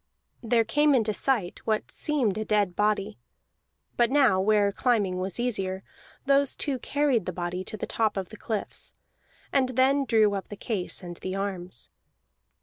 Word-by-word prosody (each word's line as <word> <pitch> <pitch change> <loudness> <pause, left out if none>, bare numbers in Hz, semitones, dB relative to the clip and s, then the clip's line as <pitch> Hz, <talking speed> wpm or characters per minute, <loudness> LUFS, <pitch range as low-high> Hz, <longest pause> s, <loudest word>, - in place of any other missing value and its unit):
There 230 -1 +2
came 295 +6 +3
into 220 -3 +1
sight 220 -7 -1
what 215 -1 -1
seemed 270 -10 0
a - - -1
dead 205 -4 +1
body; 210 0 0 0.8
but 240 -1 +4
now, 260 -9 +4
where 205 0 +3
climbing 205 -5 +1
was 185 +3 -3
easier, 195 -6 -1 0.5
those 275 0 +3
two 270 -3 -1
carried 280 -6 0
the - - -1
body 180 +1 -4
to 215 - -6
the - - -3
top 220 -3 0
of 190 -2 -3
the 215 - -11
cliffs, 215 -1 -5 0.6
and 260 -2 +3
then 275 +2 +3
drew 220 -4 +3
up 195 -1 -4
the 205 - -8
case 200 -4 -3
and 175 -1 -8
the 185 0 -5
arms. 190 -2 -5
215 Hz, 165 wpm, -27 LUFS, 195-250 Hz, 0.8 s, but